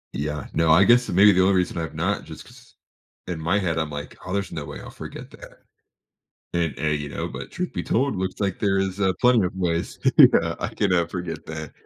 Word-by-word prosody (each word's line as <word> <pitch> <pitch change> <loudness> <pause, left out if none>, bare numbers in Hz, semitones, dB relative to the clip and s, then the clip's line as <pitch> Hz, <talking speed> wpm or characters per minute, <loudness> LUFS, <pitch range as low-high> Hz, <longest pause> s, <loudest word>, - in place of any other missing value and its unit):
Yeah, 75 0 -3
no, 80 0 +2
I 85 +5 +7
guess 120 +3 +4
maybe 100 +3 +6
the 95 0 +3
only 95 +1 +3
reason 90 -1 0
I've 80 -3 -5
not, - - -1
just - - -11
'cause, - - -18 0.5
in 85 -3 -4
my 85 +6 +1
head, 85 -5 -1
I'm 80 -1 -2
like, 75 0 -7
"Oh, 90 - -6
there's 100 -1 -2
no 75 - -5
way - - -8
I'll - - -10
forget - - -9
that," - - -14 0.9
and 85 -5 -1
and, 75 -1 0
you 75 - -5
know, - - -4
but, 65 +3 -8
truth 180 0 -4
be 90 - -3
told, 135 +1 0
looks 95 0 -4
like 100 -3 -1
there 100 -2 +1
is, 95 0 -2
uh, 95 -1 +3
plenty 125 -5 +4
of 90 - -6
ways 85 -3 -2 0.2
yeah, - - +6
I - - -2
can, 100 -3 +1
uh, 85 -2 +2
forget 85 -2 -6
that. 80 -2 -7
90 Hz, 235 wpm, -23 LUFS, 80-95 Hz, 0.9 s, I